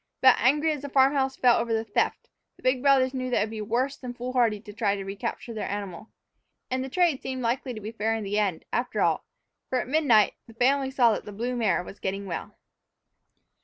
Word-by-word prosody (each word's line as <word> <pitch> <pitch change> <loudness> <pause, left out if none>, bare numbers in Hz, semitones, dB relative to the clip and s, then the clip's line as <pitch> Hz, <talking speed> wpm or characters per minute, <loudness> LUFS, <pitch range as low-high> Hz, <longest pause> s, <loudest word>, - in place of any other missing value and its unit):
But, 260 -1 +7
angry 295 +6 +3
as 295 -3 -3
the 285 - -6
farm 270 +1 +4
house 265 -1 0
felt 245 -2 +4
over 230 -1 -2
the 220 - -1
theft, 210 - -1 0.3
the - - -21
big 255 0 +2
brothers 270 -1 +4
knew 255 -1 -3
that 245 - +1
it - - +3
would 215 - -4
be 220 -1 -5
worse 245 +6 -1
than 245 -2 -7
foolhardy 245 -3 0
to 205 0 -12
try 205 -2 +1
to 195 -1 -6
recapture 230 +4 -5
their 215 - -4
animal. 200 -1 -5 0.6
And 255 0 0
the 265 - -5
trade 340 -3 +2
seemed 260 -1 -4
likely 245 +1 -1
to - - -6
be 215 +1 -6
fair 225 0 -1
in 220 - -3
the 205 +1 -1
end, 195 -6 -1
after 245 +1 -1
all, - - +1 0.4
for 255 - +1
at - - -4
midnight 255 -7 +4
the 225 - -15
family 265 +3 +2
saw 245 -4 +4
that - - -4
the 210 - -7
blue 240 +5 -3
mare 220 -6 +1
was 195 - -11
getting 195 +1 -3
well! 180 - -6
240 Hz, 235 wpm, -26 LUFS, 215-260 Hz, 0.6 s, But